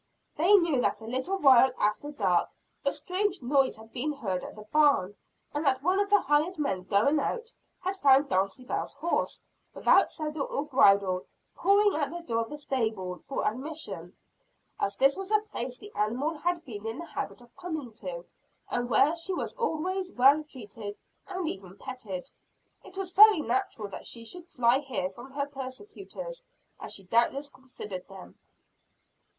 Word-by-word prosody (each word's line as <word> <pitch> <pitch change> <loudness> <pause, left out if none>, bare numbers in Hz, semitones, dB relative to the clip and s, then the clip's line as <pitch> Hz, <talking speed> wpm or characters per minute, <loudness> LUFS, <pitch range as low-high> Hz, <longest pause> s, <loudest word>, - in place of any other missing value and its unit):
They 345 +6 +4
knew 335 -9 +3
that 210 - 0
a - - -9
little 260 +12 -2
while 265 -6 +7
after 210 +8 0
dark, 295 - +1 0.3
a 280 - +2
strange 365 +6 -1
noise 270 0 +2
had 225 +1 -15
been 290 +5 -1
heard 195 -10 -3
at - - -8
the 215 - -10
barn, 275 -6 +3 0.4
and 295 - -1
that 270 -2 +1
one 370 +4 +2
of 405 0 +1
the 410 -1 +5
hired 295 +6 +1
men 195 -12 -1
going 225 +11 +3
out, 465 - -3 0.3
had 375 +1 -2
found 275 -4 +5
Dulcibel's 195 +4 -1
horse, 340 - -1 0.3
without - - +5
saddle 305 -2 -4
or 285 - -2
bridle, 200 -9 +4 0.3
pawing 405 +1 +4
at 290 -3 0
the 345 +2 -7
door 230 -8 -1
of 225 - -4
the 295 - -6
stable 220 -10 -2
for 275 - -2
admission. 295 +8 -5 0.6
As 200 - 0
this 275 +1 +4
was 390 0 -6
a 430 - +5
place 245 +1 -2
the 415 +7 -12
animal 245 +9 0
had 340 +2 -2
been 220 -4 -7
in 225 +2 -4
the 340 - -6
habit 330 - -5
of 240 0 -19
coming 315 -9 -5
to, 180 -5 -6 0.5
and 245 0 -1
where 290 +6 +4
she 350 +3 -2
was - - -3
always 370 -4 -2
well 275 +5 +5
treated 215 -7 -8 0.3
and 370 -3 -3
even 190 - -6
petted, 205 -9 -6 0.6
it 380 - -14
was 375 -2 -4
very 425 -4 +8
natural 235 -4 -1
that - - -8
she 230 -1 -6
should 350 +8 -7
fly 250 -3 +3
here 240 -10 -3
from 240 +7 -11
her 280 0 -1
persecutors, 390 - -8 0.4
as - - -6
she 195 - -3
doubtless 240 +8 +1
considered 210 -8 -8
them. 195 -2 -13
275 Hz, 175 wpm, -29 LUFS, 225-335 Hz, 0.6 s, very